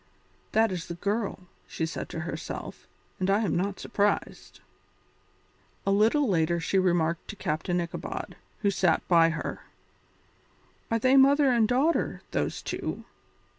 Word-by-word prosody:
"That 220 -1 +3
is 175 -3 -4
the 170 - -5
girl," 200 +2 -2 0.3
she 160 - -2
said 160 - -5
to - - -5
herself, - - -6 0.3
"and 185 +1 0
I 200 +2 +3
am 200 -8 0
not 195 +2 -1
surprised." 205 0 -1 1.3
A 195 - +2
little 225 +8 +3
later 170 -3 +1
she 185 +3 +1
remarked 170 -3 +1
to 215 - -7
Captain 175 0 -1
Ichabod, 170 -1 -5 0.3
who 200 - +3
sat 180 -4 +1
by 165 -2 +5
her: 165 - -4 1.3
"Are 230 - +2
they 255 +4 +4
mother 275 0 +6
and 230 -3 +3
daughter, 275 +8 +1
those - - -2
two?" - - -4
195 Hz, 140 wpm, -27 LUFS, 170-225 Hz, 1.3 s, mother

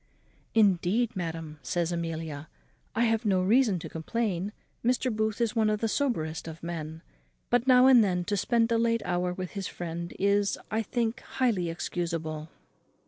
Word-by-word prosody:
"Indeed, 210 +3 +3
madam," 165 -4 -5
says 175 -1 -1
Amelia, 160 -3 -4 0.5
"I 230 - +3
have 225 -1 +2
no 190 -4 +2
reason 220 0 +4
to 165 - -6
complain; 195 +2 -2 0.3
Mr. 250 0 +1
Booth 215 0 -1
is 235 0 0
one 220 -2 +3
of 210 0 0
the 225 - 0
soberest 165 - -1
of 160 0 -9
men; 160 -1 -5 0.5
but 245 +1 +2
now 255 -1 +7
and 255 -3 +8
then 180 -3 0
to 205 +3 -1
spend 230 +4 +2
a 230 - +3
late 230 -1 +1
hour 180 0 0
with 185 0 -5
his 195 -2 -4
friend 170 0 -5
is, 200 +1 +2
I 220 +1 +1
think, 235 +2 -1
highly 220 -13 0
excusable." 165 -2 -3
195 Hz, 165 wpm, -28 LUFS, 170-230 Hz, 0.5 s, and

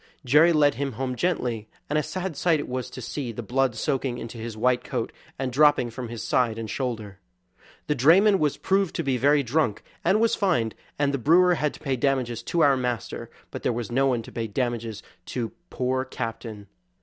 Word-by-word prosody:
Jerry 150 +7 +6
led 150 -3 +4
him 140 -1 -3
home 130 +2 -3
gently, 120 -9 -1 0.2
and 150 - -2
a 150 - +3
sad 185 +1 -4
sight 165 +1 +2
it - - -4
was 125 -1 -3
to 130 - -8
see 130 0 -4
the 115 +1 -6
blood 130 +2 +1
soaking 130 +1 -1
into 115 -1 -7
his 110 -1 -6
white 125 +2 +2
coat - - -3 0.3
and 130 -1 -2
dropping 145 -4 +4
from 120 0 -6
his 115 -1 -6
side 115 -3 +1
and 115 -1 -4
shoulder. 110 -6 -4 0.7
The 150 - +1
drayman 185 - +5
was 150 -2 +1
proved 195 -2 +1
to - - -1
be 135 -2 +1
very 145 +3 +4
drunk, 125 -4 0 0.2
and 190 +5 +3
was 230 0 +3
fined, 140 - +1 0.2
and 145 -1 +1
the 140 - 0
brewer 175 +7 +5
had 150 -3 -1
to - - -13
pay 135 -3 -1
damages 125 -4 0
to 165 +8 -1
our 140 -3 +6
master; 125 -3 -3 0.2
but - - -6
there - - +1
was 120 -1 -4
no 135 +3 +3
one 120 -3 0
to - - -11
pay 115 -1 -3
damages 115 -1 -3 0.2
to 120 -3 -3 0.2
poor 130 +1 -1
Captain. 115 -4 -6
130 Hz, 210 wpm, -25 LUFS, 115-150 Hz, 0.7 s, Jerry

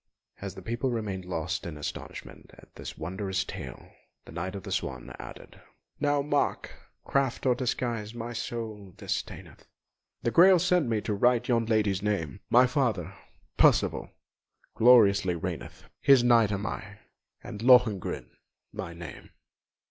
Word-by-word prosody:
As 100 -1 -6
the 95 - -10
people 120 +6 -2
remained 105 -6 -3
lost 90 -1 -3
in 80 -3 -7
astonishment 75 - -8
at - - -18
this - - -9
wondrous 95 +3 -3
tale, - - -8 0.3
the - - -12
Knight 85 +4 -4
of 100 - -7
the - - -7
Swan - - -3
added: - - -11 0.4
"Now 145 -1 +1
mark, 145 0 -1 0.3
craft 135 -2 0
or 130 - +5
disguise 120 -3 -2
my 120 +1 -5
soul 110 -5 -6
disdaineth, - - -6 0.6
The 120 - +1
Grail 185 +5 +7
sent 175 -5 +2
me 110 -2 0
to 105 - -2
right 120 +3 +2
yon 115 -2 +1
lady's 105 -4 +1
name; 100 -4 -2
My 125 +2 +6
father, 115 - -1 0.4
Percival, - - +3 0.6
gloriously 100 -6 +5
reigneth, 85 - -6 0.2
His 135 -3 +6
Knight 115 -3 +5
am 100 +1 -2
I, - - -6 0.5
and 105 - -8
Lohengrin 120 -6 +3 0.4
my 85 - -6
name!" 85 -4 -10
110 Hz, 140 wpm, -28 LUFS, 95-125 Hz, 0.6 s, Grail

